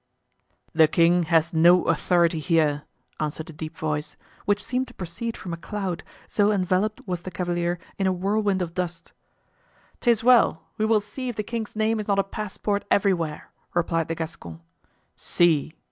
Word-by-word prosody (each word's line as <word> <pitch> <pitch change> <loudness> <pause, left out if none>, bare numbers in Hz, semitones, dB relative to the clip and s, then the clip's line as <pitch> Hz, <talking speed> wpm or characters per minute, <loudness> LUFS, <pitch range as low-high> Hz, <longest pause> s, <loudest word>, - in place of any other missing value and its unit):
"The 160 -1 +6
king 170 +2 +3
has 165 -1 +3
no 175 +3 +6
authority 170 -2 +2
here!" 155 -3 +1 0.3
answered 155 +1 -4
a - - -14
deep 155 +1 -7
voice, 150 -1 -3 0.3
which 205 -1 +1
seemed 255 +1 -1
to - - -14
proceed 190 +6 -5
from 175 - -6
a - - -4
cloud, 190 -1 -4 0.2
so 205 0 +2
enveloped 195 +2 0
was 180 -2 -2
the 185 - -6
cavalier 175 -1 -1 0.2
in 195 - +2
a - - +3
whirlwind 195 +1 0
of 170 -1 -6
dust. 175 -2 -4 0.9
"'Tis 235 -3 +2
well, 240 -9 +5 0.2
we 215 - +2
will 220 -1 +3
see 255 +5 -6
if 240 - -4
the 210 - -2
king's 225 0 -5
name 220 +1 +1
is 210 - -4
not 200 -1 +2
a 195 - +4
passport 205 0 -3
everywhere," 170 -6 0 0.2
replied 165 -2 +1
the 165 - -2
Gascon. 150 - -7 0.5
"See!" 165 -2 +1
180 Hz, 170 wpm, -25 LUFS, 165-205 Hz, 0.9 s, The